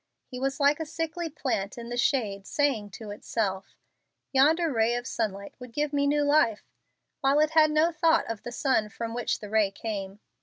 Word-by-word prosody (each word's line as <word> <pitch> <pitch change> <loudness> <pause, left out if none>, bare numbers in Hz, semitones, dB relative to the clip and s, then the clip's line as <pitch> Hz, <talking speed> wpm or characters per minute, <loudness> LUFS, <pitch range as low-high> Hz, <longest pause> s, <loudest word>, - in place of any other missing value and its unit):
He 250 - -8
was 270 +2 -2
like 285 +1 +3
a 320 - -3
sickly 330 +1 -3
plant 245 -10 -3
in 235 0 -7
the 240 - -3
shade 215 -6 0
saying 265 -8 0
to 215 -2 -8
itself, 200 -2 -3 0.6
"Yonder 310 +4 +4
ray 225 +1 +2
of 245 0 -3
sunlight 200 -5 -3
would 250 -1 -10
give 295 +1 -1
me 285 0 +2
new 295 +1 +2
life," 285 -7 +3 0.6
while 275 +2 +3
it 305 0 +3
has 315 -1 +5
no 310 +3 +3
thought 330 0 +3
of 230 -2 -5
the 240 - -7
sun 240 -4 +1
from 230 +1 -5
which 240 0 -2
the 210 - -7
ray 215 -2 +3
came. 195 -1 -5
250 Hz, 195 wpm, -27 LUFS, 215-295 Hz, 0.6 s, has